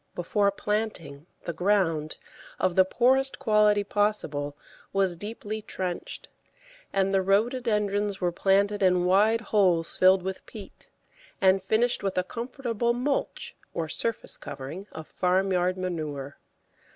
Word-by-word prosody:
Before 200 +4 +1
planting, 200 -8 -3 0.2
the 170 - -4
ground, 170 -5 +1 0.4
of 180 - +1
the 190 - +6
poorest 265 +6 +2
quality 210 -1 +3
possible, 195 -9 -1 0.3
was 195 -2 +1
deeply 215 +3 -5
trenched, 185 -4 -5 0.6
and 195 0 +1
the 195 - +3
Rhododendrons 210 -1 +1
were 180 -1 0
planted 200 +3 +2
in 180 -2 +3
wide 210 +5 +4
holes 185 -6 +2
filled 185 0 +5
with 190 0 -4
peat, 210 -4 -12 0.5
and 190 0 +4
finished 220 +5 +1
with 195 -2 -2
a 185 - +3
comfortable 235 +1 -2
"mulch," 265 +4 -2 0.2
or 165 -1 -2
surface 230 +8 -2
covering 145 +8 -8
of 160 0 -8
farmyard 185 0 +1
manure. 155 -6 -4
195 Hz, 125 wpm, -27 LUFS, 180-210 Hz, 0.6 s, the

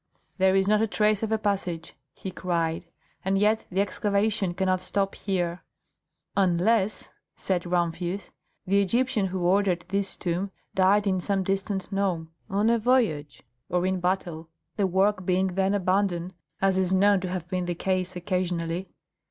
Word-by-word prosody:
"There 190 0 +4
is 195 0 +3
not 210 +1 +4
a 225 - +2
trace 210 0 +2
of 220 -1 -2
a 220 - +3
passage!" 190 -6 -2 0.2
he 190 - -7
cried; 170 -1 -2 0.4
"and 195 +1 +1
yet 210 +2 +2
the 190 +2 +1
excavation 200 -2 0
cannot 185 0 +1
stop 195 +1 -1
here." 180 -3 -2 0.7
"Unless," 195 +3 +2 0.3
said 180 -2 -2
Rumphius, 175 +2 -1 0.3
"the 200 +2 +3
Egyptian 230 +1 +1
who 185 0 -3
ordered 185 -2 +2
this 195 0 0
tomb 180 +3 -2 0.2
died 195 +2 +4
in 190 -2 +1
some 195 0 0
distant 195 0 -2
nome, 185 -5 -1 0.2
on 210 +3 +2
a 235 - +3
voyage, 220 - +1 0.3
or 180 0 +1
in 185 0 0
battle, 175 -3 -2 0.3
the 200 -2 +1
work 190 +1 +2
being 185 +1 +1
then 195 +2 +1
abandoned, 185 -2 0 0.3
as 190 -1 +3
is 190 0 +2
known 200 +1 +4
to 185 0 -4
have 180 -2 -4
been 180 0 -2
the 175 0 -2
case 185 +1 -1
occasionally." 180 -1 -2
190 Hz, 160 wpm, -26 LUFS, 180-200 Hz, 0.7 s, There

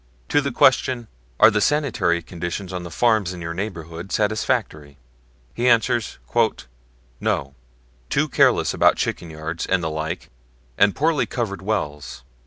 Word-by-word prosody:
To 145 - +3
the 140 0 -2
question, 125 -1 +3 0.3
"Are - - +8
the 105 0 +1
sanitary 115 - +1
conditions 90 +3 -5
on 90 - -3
the 85 - -7
farms 105 +1 +1
in 90 - -8
your 85 0 -4
neighborhood 85 -2 -6
satisfactory?" 105 - -1 0.6
he 120 +1 +1
answers: 115 -1 +2 1.0
"No; 70 0 -1 0.6
too - - +1
careless - - +3
about - - +4
chicken 85 - -3
yards, 80 +1 -5
and 95 -2 +1
the 80 - -1
like, 80 +3 -4 0.4
and 100 +6 +3
poorly 155 -1 +1
covered 100 -7 -3
wells. 75 - -3
95 Hz, 140 wpm, -22 LUFS, 80-115 Hz, 1.0 s, Are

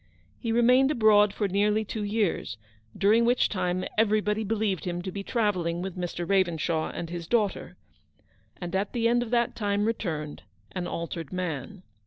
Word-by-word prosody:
He 230 - -2
remained 250 +3 +5
abroad 215 -6 +5
for 205 0 -1
nearly 210 +3 +1
two 215 +1 -4
years; 205 - -1 0.4
during 215 +4 +4
which 245 +1 +3
time 185 -2 -1
even 215 -1 +3
body 210 +1 0
believed 210 -4 -1
him 175 -1 -3
to 190 - -4
be 200 - -5
travelling 185 -7 -1
with 190 -2 -5
Mr, 175 -1 -4
Ravenshaw 170 -4 +1
and 170 -1 -6
his 170 -2 -5
daughter, 215 -3 0 0.8
and 175 0 -4
at 195 +1 -1
the 230 -2 +2
end 240 +1 +3
of 240 - -4
that 240 0 +1
time 205 -1 0
returned; 160 -10 -3 0.3
an 180 -1 -4
altered 165 -2 -5
man. 180 0 -4
200 Hz, 170 wpm, -27 LUFS, 175-220 Hz, 0.8 s, remained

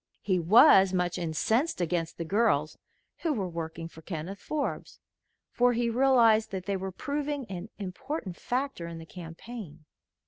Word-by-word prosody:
He 185 -3 +1
was 190 - +7
much 180 -1 0
incensed 220 - 0
against 170 -1 -1
the 165 - -4
girls 175 -6 +2 0.4
who 325 -3 0
were 200 -8 -2
working 165 -1 -5
for 165 -1 -14
Kenneth 170 +3 -6
Forbes, 300 -2 -4 0.5
for 245 0 +3
he 235 0 0
realized 230 -3 +4
that 190 -2 -5
they 200 0 -1
were 190 0 -4
proving 285 - -3
an 185 +3 -6
important 195 - -5
factor 255 -8 -3
in 170 -1 -7
the 165 - -9
campaign. 170 -1 -9
190 Hz, 150 wpm, -29 LUFS, 170-240 Hz, 0.5 s, was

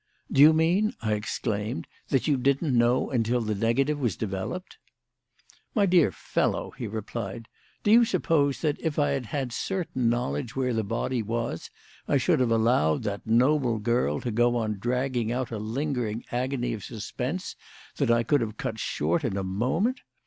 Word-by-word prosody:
"Do 135 - +4
you 150 +2 +10
mean," 180 +9 +2
I 110 -1 +1
exclaimed, 105 +2 -2 0.2
"that 130 -3 +1
you 150 - +3
didn't 140 +2 +1
know 120 +3 +2
until 120 -1 +1
the 110 -2 -1
negative 135 +8 +1
was 120 -9 0
developed?" 105 - -5 1.0
"My 205 -3 +4
dear 175 - +4
fellow," - - -1
he 120 - -6
replied, 110 0 -5 0.4
"do 205 - +3
you 235 +2 +8
suppose 160 - +1
that, 150 -3 0
if 160 -3 -2
I 145 -1 +3
had 135 -4 -2
had 130 -1 -3
certain 160 -11 -1
knowledge 115 - -2
where 130 -2 0
the 110 -1 0
body 115 +4 -1
was, 115 -4 -3 0.4
I 145 - +3
should 155 +3 +2
have 125 -2 +2
allowed 110 -9 +2
that 100 +2 -4
noble 125 +1 +3
girl 105 - 0
to 120 - -3
go 120 +2 +2
on 110 -3 -1
dragging 125 0 -1
out 125 0 -2
a 110 - -3
lingering 120 -1 -2
agony 125 -1 -1
of 105 -4 -6
suspense 125 - -4 0.4
that 140 -4 +1
I 115 0 +4
could 145 +3 +2
have 110 -1 -4
cut 110 - -4
short 165 - 0
in 110 -7 -1
a 95 - -1
moment? 130 - 0
120 Hz, 175 wpm, -27 LUFS, 110-140 Hz, 1.0 s, you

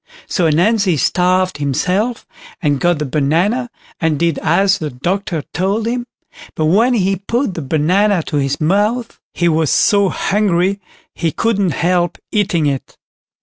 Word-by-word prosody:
So 175 -3 0
Ananzi 185 +3 +2
starved 185 +3 +1
himself, 185 - -1 0.3
and 145 -5 0
got 175 +1 +2
the 150 - -3
banana, 165 - 0 0.3
and 160 -2 0
did 170 0 0
as 195 +4 +2
the 155 - -3
doctor 170 +4 -3
told 200 +5 -1
him; 240 +1 -2 0.5
but 155 - 0
when 225 +10 +3
he 195 -2 +1
put 230 +3 -2
the 165 - -5
banana 170 +6 +1
to 150 - -3
his 140 0 -1
mouth, 205 +8 0
he 175 - 0
was 160 -2 +1
so 200 -3 +3
hungry 195 -1 0 0.3
he 165 -2 -1
couldn't 200 -6 0
help 175 +2 0
eating 200 -7 +1
it. 140 -2 -3
180 Hz, 145 wpm, -17 LUFS, 160-205 Hz, 0.5 s, when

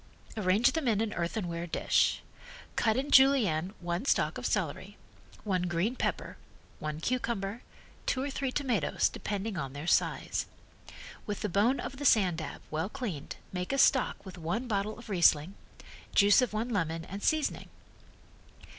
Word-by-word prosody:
Arrange 205 +2 +3
them 320 -5 -2
in 215 -3 +2
an 220 -1 -1
earthenware 170 -1 -3
dish. - - +1 0.5
Cut 220 -1 +2
in 280 +2 -2
Julienne 215 - +4
one 175 +5 -3
stalk - - +1
of - - -2
celery, - - -2 0.5
one 185 -4 0
green 175 +8 0
pepper, - - -3 0.4
one 155 0 -4
cucumber, 230 -1 -2 0.5
two 255 - +1
or 285 - -3
three 270 -1 -2
tomatoes, 255 -6 +1
depending 205 0 -4
on 135 -3 -4
their 145 +2 -6
size. - - +1 0.8
With 205 -1 -3
the - - -1
bone 215 +9 +2
of 265 - -5
the 285 - -5
sand 185 -9 +4
dab, 160 - -7
well 160 +5 -1
cleaned, 220 - -5 0.2
make 180 0 -3
a 275 - 0
stock 265 -4 +3
with 190 -1 -9
one 175 +10 -2
bottle 210 -1 -1
of 240 - -12
Riesling, 170 -3 +3 0.6
juice 205 +4 +6
of 250 - 0
one 220 +3 -2
lemon 165 -6 -1
and 200 +2 -7
seasoning. 310 +4 0
205 Hz, 155 wpm, -30 LUFS, 175-245 Hz, 0.8 s, juice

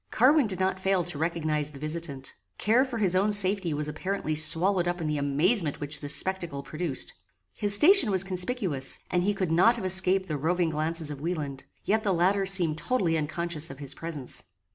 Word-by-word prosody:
Carwin 270 +2 +3
did 190 -3 -3
not 190 0 -1
fail 190 -1 0
to 155 - -3
recognize 155 -3 -2
the 145 - -12
visitant. 155 -3 -5 0.2
Care 230 +5 +2
for 260 -3 -5
his 190 -5 +1
own 200 +3 +1
safety 195 -3 +1
was 150 0 -3
apparently 155 +2 -4
swallowed 175 +4 +3
up 175 0 -2
in 165 - -4
the 150 -1 -2
amazement 150 - 0
which 145 0 -4
this 145 +1 -1
spectacle 175 -7 -2
produced. 155 -2 -5 0.4
His 205 -1 +7
station 310 - +7
was 190 -2 +3
conspicuous, 185 - -2
and 180 - +1
he 205 +3 -1
could 185 -4 -3
not 185 +9 +4
have 230 - -6
escaped 185 +1 +3
the 155 -3 -3
roving 165 +3 -1
glances 155 0 -3
of 140 -1 -9
Wieland; 150 -5 -5 0.2
yet 220 +2 +1
the 200 -4 -1
latter 190 +3 +1
seemed 175 -5 +2
totally 185 -9 -1
unconscious 160 +1 -3
of 135 - -10
his 140 -1 -7
presence. 155 -6 -6
175 Hz, 195 wpm, -26 LUFS, 155-195 Hz, 0.4 s, His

